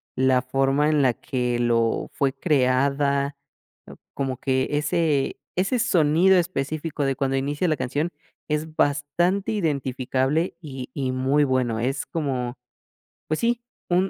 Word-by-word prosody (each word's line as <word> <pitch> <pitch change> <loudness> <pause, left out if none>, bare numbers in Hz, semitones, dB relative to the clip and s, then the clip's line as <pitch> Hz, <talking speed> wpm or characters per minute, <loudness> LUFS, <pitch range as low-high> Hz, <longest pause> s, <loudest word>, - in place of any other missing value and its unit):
la 130 -1 +3
forma 135 +3 +1
en 150 -2 +3
la 125 -3 +3
que 125 -2 -2
lo 115 -1 +1
fue 135 -2 0
creada, 140 -1 +1 0.5
ah, - - -11 0.2
como 135 -2 -2
que 130 -1 0
ese 150 -1 +1 0.2
ese 195 +7 +1
sonido 180 -4 +4
específico 155 -2 -2
de 135 -1 0
cuando 135 0 0
inicia 145 +6 -1
la 155 - +1
canción 145 +7 -1 0.4
es 155 +1 -2
bastante 175 +10 +1
identificable 140 -2 0
y 135 -5 -7
y 130 -2 -2
muy 135 +3 +2
bueno. 125 -4 0
Es 135 +4 -1
como, 130 -6 -3 0.7
pues 155 - -1
sí, 235 0 +1 0.3
un 180 +1 +3
un 195 - -2
140 Hz, 140 wpm, -24 LUFS, 130-155 Hz, 0.7 s, sonido